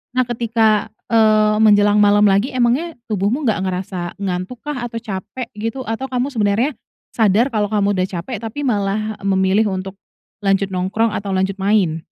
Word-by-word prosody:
Nah, 255 - +3
ketika, 225 -3 +1 0.2
eee, 215 -1 +4
menjelang 205 -1 +5
malam 205 0 +5
lagi, 205 +6 +2
emangnya 255 +7 +1 0.2
tubuhmu 210 +9 0
nggak 220 -5 +1
ngerasa 185 -1 -4
ngantuk 190 +4 -4
kah, 265 -5 -4
atau 230 - -12
capek, 225 +5 -6
gitu? 225 +5 -4
Atau, 225 +4 -4
kamu 260 +2 -2
sebenarnya 220 +4 +1 0.4
sadar, 225 +4 +2
kalau 210 -2 0
kamu 205 -1 +1
udah 185 - +1
capek, 195 +4 -5
tapi 230 +6 -5
malah 215 -3 -1
memilih 195 +2 +2
untuk 190 0 -5 0.4
lanjut 195 -1 +1
nongkrong, 195 +5 0
atau 200 -2 -3
lanjut 190 +1 -1
main? 190 -6 +1
210 Hz, 160 wpm, -19 LUFS, 195-230 Hz, 0.4 s, menjelang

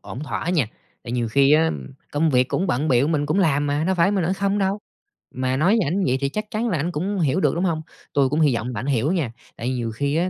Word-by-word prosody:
ổn 125 - -8
thỏa 155 +3 -4
nha. 155 -11 +2 0.4
Tại 120 - -6
nhiều 120 -2 -1
khi 140 +5 +4
á 160 +1 +4 0.4
công 155 +2 +2
việc 125 -1 +3
cũng 190 - 0
bận 145 +2 0
bịu, 130 +1 +3
mình 150 -3 0
cũng 155 +6 +1
làm 145 -6 +2
mà, 145 +2 0
đâu 190 - +1
phải 180 +2 +3
mình 195 -4 0
ở 180 - +1
không 200 +1 0
đâu. 195 +1 0 0.6
Mà 130 0 0
nói 185 +10 +3
với 180 - 0
ảnh 190 +5 0
vậy 130 +1 +2
thì 140 - 0
chắc 215 +7 -3
chắn 225 +3 -1
là 185 - 0
ảnh 165 +5 -1
cũng 190 +5 -2
hiểu 150 -1 +1
được, 190 - +2
đúng 175 - -1
hông? 165 -4 0 0.3
Tui 140 -3 +3
cũng 150 - 0
hy 140 -6 +4
vọng 120 +2 -3
bạn 115 +4 -4
hiểu 140 +3 +1
nha, 155 -11 -1 0.2
tại 120 - -3
nhiều 120 -3 -2
khi 140 +6 -1
á, 175 +3 +1
150 Hz, 280 wpm, -22 LUFS, 130-180 Hz, 0.6 s, khi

